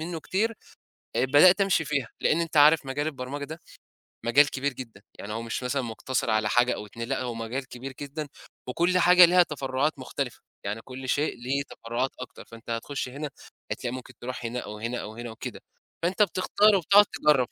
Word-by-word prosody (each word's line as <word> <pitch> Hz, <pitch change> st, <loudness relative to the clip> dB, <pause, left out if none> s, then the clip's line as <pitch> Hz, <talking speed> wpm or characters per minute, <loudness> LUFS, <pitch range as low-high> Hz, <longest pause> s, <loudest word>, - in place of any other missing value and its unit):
منُّه 165 Hz, 0 st, -4 dB
كتير، 220 Hz, +7 st, 0 dB, 0.6 s
آآ -, -, +3 dB
بدأت 160 Hz, +9 st, +6 dB
أمشي 195 Hz, -4 st, +3 dB
فيها 140 Hz, -5 st, -1 dB
لإن 165 Hz, -, +2 dB
أنت 165 Hz, -2 st, -3 dB
عارف 150 Hz, 0 st, +6 dB
مجال 145 Hz, +3 st, -2 dB
البرمجة 140 Hz, 0 st, -4 dB
ده 160 Hz, +3 st, -8 dB, 0.7 s
مجال 140 Hz, +5 st, +5 dB
كبير 140 Hz, 0 st, -2 dB
جدًا، 115 Hz, -6 st, -10 dB, 0.2 s
يعني 105 Hz, +1 st, -6 dB
هو 115 Hz, -, -3 dB
مش 115 Hz, +2 st, -4 dB
مثلًا 130 Hz, +2 st, 0 dB
مقتصِر 115 Hz, +1 st, -2 dB
على 110 Hz, -1 st, +2 dB
حاجة 120 Hz, +1 st, +3 dB
أو 105 Hz, -, -7 dB
2 115 Hz, +3 st, -7 dB
لأ 135 Hz, -, -1 dB
هو 120 Hz, -2 st, -3 dB
مجال 115 Hz, +3 st, -4 dB
كبير 130 Hz, +2 st, -8 dB
جدًا 145 Hz, +1 st, -5 dB, 0.4 s
وكل 175 Hz, +8 st, +1 dB
حاجة 180 Hz, 0 st, +8 dB
ليها 180 Hz, +1 st, +5 dB
تفرُّعات 140 Hz, -1 st, -2 dB
مختلِفة، 130 Hz, 0 st, -4 dB, 0.2 s
يعني 105 Hz, +3 st, -3 dB
كل 130 Hz, +1 st, -8 dB
شيء 145 Hz, +3 st, +1 dB
ليه 140 Hz, +2 st, 0 dB
تفرّعات 120 Hz, +3 st, -3 dB
أكتر، 130 Hz, -, -9 dB
فأنت 115 Hz, 0 st, -13 dB
هتخش 125 Hz, +3 st, -3 dB
هنا 145 Hz, +3 st, -5 dB, 0.4 s
هتلاقي 125 Hz, 0 st, -3 dB
ممكن 130 Hz, -1 st, -8 dB
تروح 125 Hz, -1 st, -5 dB
هنا 120 Hz, +2 st, -3 dB
أو 105 Hz, -2 st, -7 dB
هنا 115 Hz, +3 st, -3 dB
أو 110 Hz, -, -8 dB
هنا 120 Hz, -1 st, -6 dB
وكده، 110 Hz, -, -7 dB, 0.4 s
فأنت 185 Hz, +4 st, +1 dB
بتختار 205 Hz, +3 st, +3 dB
وبتقعُد 200 Hz, +3 st, +6 dB
تجرّب 140 Hz, -9 st, +2 dB
135 Hz, 190 wpm, -27 LUFS, 120-155 Hz, 0.7 s, حاجة